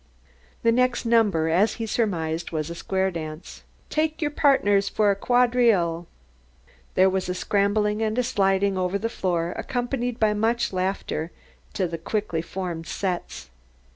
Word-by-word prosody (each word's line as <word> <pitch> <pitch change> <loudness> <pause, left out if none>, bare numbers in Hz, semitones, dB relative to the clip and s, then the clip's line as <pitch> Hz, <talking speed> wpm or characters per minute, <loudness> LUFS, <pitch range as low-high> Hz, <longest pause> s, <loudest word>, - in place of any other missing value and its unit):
The 230 - +4
next 250 0 +1
number, 210 -9 +3
as 180 +7 +3
he 225 - -4
surmised, 170 -7 -1
was 155 0 -3
a - - -3
square 190 +2 -1
dance. 155 -1 -7 0.3
"Take 310 0 0
your 295 -2 -1
pardners 205 -10 +3
fer 210 -1 +2
a - - 0
quadrille!" 230 -8 +2 0.9
There 185 +1 +5
was 190 -1 -1
a 180 - -1
scrambling 210 +2 +1
and 220 +1 -1
a 250 - +2
sliding 195 -4 +1
over 185 +2 0
the 225 +3 -2
floor, 175 -5 -1
accompanied 245 -1 -3
by 215 -1 +3
much 225 +1 0
laughter, 185 -3 -2 0.4
to 190 -3 0
the 165 -1 -5
quickly 170 -2 -2
formed 170 -2 -5
"sets." 180 - -4
200 Hz, 150 wpm, -24 LUFS, 175-230 Hz, 0.9 s, There